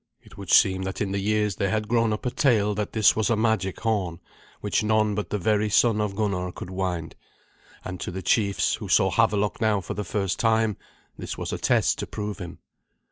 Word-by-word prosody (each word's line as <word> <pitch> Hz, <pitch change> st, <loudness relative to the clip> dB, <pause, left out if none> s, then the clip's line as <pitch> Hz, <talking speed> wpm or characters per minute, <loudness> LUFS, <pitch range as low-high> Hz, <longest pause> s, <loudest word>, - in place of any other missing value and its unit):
It -, -, -17 dB
would -, -, -9 dB
seem 95 Hz, -1 st, +5 dB
that 95 Hz, +1 st, -4 dB
in 100 Hz, -2 st, -2 dB
the 100 Hz, -, -1 dB
years 105 Hz, 0 st, 0 dB
there 100 Hz, -, 0 dB
had 110 Hz, +1 st, -1 dB
grown 115 Hz, 0 st, +2 dB
up 105 Hz, -, -4 dB
a 125 Hz, -, 0 dB
tale 110 Hz, -8 st, +2 dB
that 105 Hz, 0 st, -3 dB
this 110 Hz, -2 st, +4 dB
was 110 Hz, -2 st, 0 dB
a 115 Hz, -, +3 dB
magic 110 Hz, -4 st, 0 dB
horn, 100 Hz, -7 st, -1 dB, 0.4 s
which -, -, 0 dB
none 110 Hz, -1 st, +2 dB
but 105 Hz, 0 st, -3 dB
the 105 Hz, -, -1 dB
very 105 Hz, +2 st, +1 dB
son 110 Hz, +1 st, +3 dB
of 105 Hz, -2 st, -2 dB
Gunnar 95 Hz, -4 st, -1 dB
could 90 Hz, -, -9 dB
wind, 90 Hz, -4 st, -3 dB, 0.7 s
and 95 Hz, -1 st, -6 dB
to -, -, -4 dB
the 95 Hz, +1 st, -6 dB
chiefs 100 Hz, -3 st, +1 dB
who -, -, -5 dB
saw -, -, +4 dB
Havelok 105 Hz, +1 st, +1 dB
now 110 Hz, -2 st, +2 dB
for 90 Hz, -, -6 dB
the 105 Hz, -, -4 dB
first 100 Hz, 0 st, -2 dB
time 110 Hz, -2 st, +2 dB, 0.4 s
this -, -, -5 dB
was -, -, -4 dB
a -, -, -3 dB
test -, -, +2 dB
to -, -, -4 dB
prove 105 Hz, 0 st, -5 dB
him. 85 Hz, -3 st, -8 dB
105 Hz, 220 wpm, -25 LUFS, 95-110 Hz, 0.7 s, seem